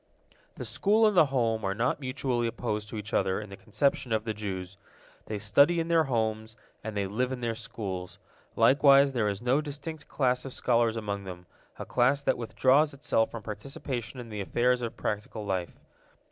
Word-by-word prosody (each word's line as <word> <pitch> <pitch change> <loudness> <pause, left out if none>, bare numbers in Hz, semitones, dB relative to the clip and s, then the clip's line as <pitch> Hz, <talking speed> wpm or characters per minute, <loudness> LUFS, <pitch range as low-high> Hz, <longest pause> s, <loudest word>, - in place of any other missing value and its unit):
The - - -6
school 215 +3 +3
and 210 -2 +3
the 160 -4 +6
home 115 -5 0
are 95 0 -1
not 120 +7 0
mutually 130 -3 -1
opposed 105 -2 -3
to 110 - -6
each 105 +1 -7
other 95 0 +1
in 105 -1 -8
the 100 - -8
conception 110 +5 -1
of 110 -1 +1
the 110 - -1
Jews. 95 -3 -5 0.5
They 105 - -3
study 140 - +4
in 165 0 -2
their 165 -2 +4
homes, 110 -3 -1 0.3
and 110 -1 -5
they 100 - 0
live 125 +7 -1
in 130 - -3
their 120 -1 -1
schools. 105 -6 -6 0.4
Likewise 140 0 +6
there 110 -4 +1
is 100 +3 -4
no 130 +4 +3
distinct 150 +1 -7
class 125 -2 +1
of 135 - -7
scholars 115 -2 +1
among 100 -2 -4
them, 90 -1 -8 0.3
a - - -6
class 135 +4 +2
that - - +1
withdraws 135 +5 +3
itself 135 -6 +1
from 115 -2 -8
participation 120 +3 -5
in 120 -2 -8
the 105 -2 -4
affairs 125 +5 +1
of 115 -1 -4
practical 105 0 -4
life. 95 -3 -3
115 Hz, 190 wpm, -28 LUFS, 105-135 Hz, 0.5 s, the